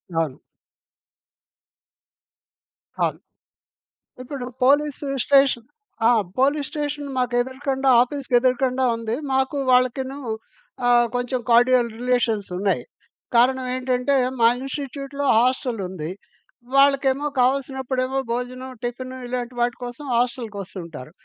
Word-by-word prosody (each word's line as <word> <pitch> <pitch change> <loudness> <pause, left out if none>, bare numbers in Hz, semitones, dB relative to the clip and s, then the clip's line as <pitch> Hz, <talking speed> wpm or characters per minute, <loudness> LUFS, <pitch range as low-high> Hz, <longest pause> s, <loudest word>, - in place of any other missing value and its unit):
అవును. 160 -5 -1 2.6
కాదు. - - 0 1.0
ఇప్పుడు 255 0 -6 0.2
పోలీసు‌స్టేషన్ 275 -3 +2 0.4
ఆ! - - +6 0.3
పోలీస్‌ 285 +2 +2
స్టేషన్ 295 -1 -3
మాకెదురుగుండా 260 +2 0
ఆఫీస్‌కెదురుగండా 255 0 +1
ఉంది. 230 0 -3 0.2
మాకు 265 +2 +1
వాళ్ళకిను 255 +2 +2 0.7
ఆహ్, 240 0 +5
కొంచెం 245 +1 -1
కార్డియల్ 245 0 +5
రిలేషన్సున్నాయి. 215 -6 0 0.5
కారణం 255 +2 +4
ఏంటంటే, 255 +2 0 0.2
మా 230 - +6
ఇన్సి‌‌టిట్యూట్‌లో 275 +1 -5
హాస్టలుంది. 220 - 0 0.7
వాళ్ళకేమో 275 0 +4
కావాల్సినప్పుడేమో 265 0 0
భోజనం, 255 +2 -4
టిఫిను 255 +2 -5
ఇలాంటి 245 0 -4
వాటి 240 0 +1
కోసం 245 +4 -7
హాస్టకొస్తుంటారు. 200 - -4
255 Hz, 80 wpm, -23 LUFS, 240-270 Hz, 2.6 s, ఆ